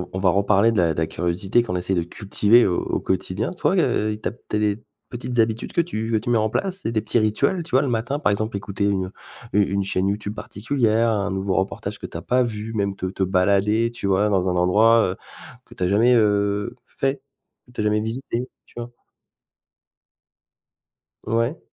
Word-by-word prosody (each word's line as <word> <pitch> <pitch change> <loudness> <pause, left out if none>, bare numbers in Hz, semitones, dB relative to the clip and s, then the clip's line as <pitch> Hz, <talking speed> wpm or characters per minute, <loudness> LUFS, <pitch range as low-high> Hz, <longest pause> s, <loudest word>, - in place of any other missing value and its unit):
v - - -17
on 95 - -3
va 95 -1 +2
reparler 100 +3 +3
de - - -3
la 85 -2 +3
de - - -10
la 80 - +1
curiosité 90 +8 0
qu'on 90 -6 -4
essaie 90 +2 -1
de 85 - +1
cultiver 105 +5 +3
au 90 - 0
au - - -2
quotidien 95 +4 -2
toi, 185 +1 0
heu, 110 - +1
i 105 - -7
tu - - -2
as - - -5
peut-être 105 -2 -4
des 105 +1 0 0.3
petites 120 0 -5
habitudes 110 0 0
que 170 - +2
tu 115 -9 -2
que - - +3
tu 110 - -7
mets 120 - +4
en 110 0 0
place? 190 - -2
C'est 115 - -2
des 110 - +1
petits 110 +2 0
rituels? 140 - +1
Tu 160 - -12
vois, 130 - +4
le 140 - -1
matin, 120 +4 -1
par 105 - +1
exemple 110 +1 -1
écouter 100 0 -4
une 95 -2 0 0.4
u 105 - +5
une 100 0 0
chaîne 95 0 -1
YouTube 105 +1 -3
particulière, 115 0 0
un 100 -2 -1
nouveau 95 0 -1
reportage 95 +1 -3
que - - -6
tu - - -9
as - - -6
pas 125 +1 +2
vu, 110 -1 -4
même 100 -2 -1
te 95 - -4
te 95 +1 -3
balader, 100 +5 +2
tu 120 -4 -5
vois, 100 +2 +2
dans 95 -2 +1
un 90 - -1
endroit, 110 +6 +4
heu, - - -8 0.5
que - - -16
tu - - -7
as 90 - +2
jamais, 115 +6 +4
heu, 105 -2 +1
fait? 135 0 -2 0.4
Que 125 - -20
tu 125 - -5
as - - 0
jamais 105 0 +2
visité, 120 +2 -3 0.2
tu - - -24
vois? 120 0 -6 2.4
Ouais. 115 +8 0
105 Hz, 225 wpm, -22 LUFS, 95-115 Hz, 2.4 s, u